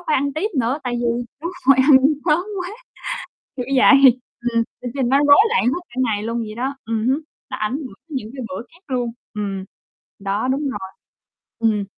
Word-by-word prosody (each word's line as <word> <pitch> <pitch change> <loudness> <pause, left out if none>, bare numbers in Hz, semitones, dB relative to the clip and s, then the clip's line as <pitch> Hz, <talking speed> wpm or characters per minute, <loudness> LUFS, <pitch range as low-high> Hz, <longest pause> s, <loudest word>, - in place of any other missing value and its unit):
a, - - -16
phải 305 - +2
ăn 280 +1 0
tiếp 380 +8 0
nữa 245 +6 0
tại 245 - -1
vì 240 - -2
đúng 235 +1 0 0.5
rồi, 275 - +8
ăn 275 -1 +7 0.3
sớm 310 +1 +4 0.2
quá, 360 - -4 0.9
kiểu 250 - -2
vậy, 265 -1 +7 0.3
ừm, 230 0 +3 0.2
lịch 245 -1 -4
trình 255 -3 +1
nó 275 - +5
rối 285 0 +7
loạn 470 - +2
hết 265 +9 +1
cả 240 - -16
ngày 210 -3 0
luôn 230 +1 -2
vậy 215 -2 -5
đó, 265 +3 -2
ừm 225 0 -1
hứm, 265 +3 +2 0.3
nó - - -4
ảnh 215 +3 -1
hưởng 255 -10 -8
những 265 -9 -5
cái 260 - -5
bữa 185 - -5
khác 345 - -22
luôn. 245 -3 -1 0.2
Ừm, 195 -2 -3 0.5
đó, 200 +4 -1
đúng 265 +2 0
rồi. 190 -6 -6 0.7
Ừm. 215 -3 +1
245 Hz, 205 wpm, -21 LUFS, 220-275 Hz, 0.9 s, rồi